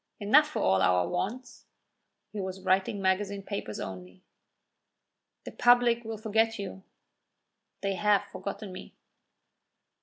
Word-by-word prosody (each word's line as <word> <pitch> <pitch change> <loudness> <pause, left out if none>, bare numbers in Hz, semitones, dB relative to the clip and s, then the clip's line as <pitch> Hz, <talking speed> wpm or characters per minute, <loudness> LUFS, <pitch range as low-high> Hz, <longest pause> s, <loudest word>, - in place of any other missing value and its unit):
"Enough 275 +9 +5
for 305 - -3
all 95 0 +3
our 90 -1 +3
wants." 220 +8 -4 0.7
(He 210 - -3
was 190 0 -6
writing 190 +1 +1
magazine 195 +1 0
papers 195 - -5
only.) 90 -1 -8 1.2
"The - - -8
public 245 -1 +4
will 225 -1 -5
forget 225 +1 +1
you." 195 -1 -6 1.0
"They 195 0 -1
have 205 +2 +2
forgotten 200 0 -7
me." 185 - -10
200 Hz, 120 wpm, -29 LUFS, 185-225 Hz, 1.2 s, Enough